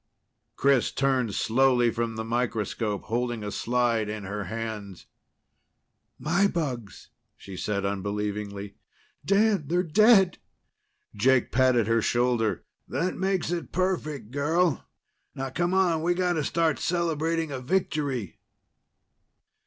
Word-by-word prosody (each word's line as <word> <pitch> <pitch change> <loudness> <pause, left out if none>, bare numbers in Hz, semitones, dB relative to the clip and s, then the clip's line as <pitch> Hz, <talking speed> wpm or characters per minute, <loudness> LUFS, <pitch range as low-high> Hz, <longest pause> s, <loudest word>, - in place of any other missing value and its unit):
Chris 135 -3 +3
turned 130 -6 0
slowly 120 0 +3
from 115 -1 -2
the 110 - -3
microscope, 115 -3 -2
holding 120 -1 -2
a 105 - -4
slide 120 -3 0
in 105 -1 -5
her 100 +1 -4
hands. 105 -2 -6 1.1
"My 175 +6 +2
bugs," 130 - -4 0.3
she 95 - -10
said 100 +1 -2
unbelievingly. 100 0 -3 0.5
"Dan, 200 -5 +2
they're 175 +4 +1
dead!" 195 +1 +5 0.7
Jake 125 +4 +2
patted 130 -3 +3
her 115 +1 +2
shoulder. 120 -5 +1 0.2
"That 185 +2 -1
makes 190 -3 -1
it 175 -1 -3
perfect, 155 - -2
girl. 160 +2 +1 0.5
Now 135 0 -4
come 175 +5 0
on. 175 -4 +2
We've 175 +2 +1
got 180 -1 +1
to 160 -3 -1
start 165 +1 +1
celebrating 165 -2 -1
a 135 - -4
victory!" 140 - -2
130 Hz, 120 wpm, -26 LUFS, 110-165 Hz, 1.1 s, dead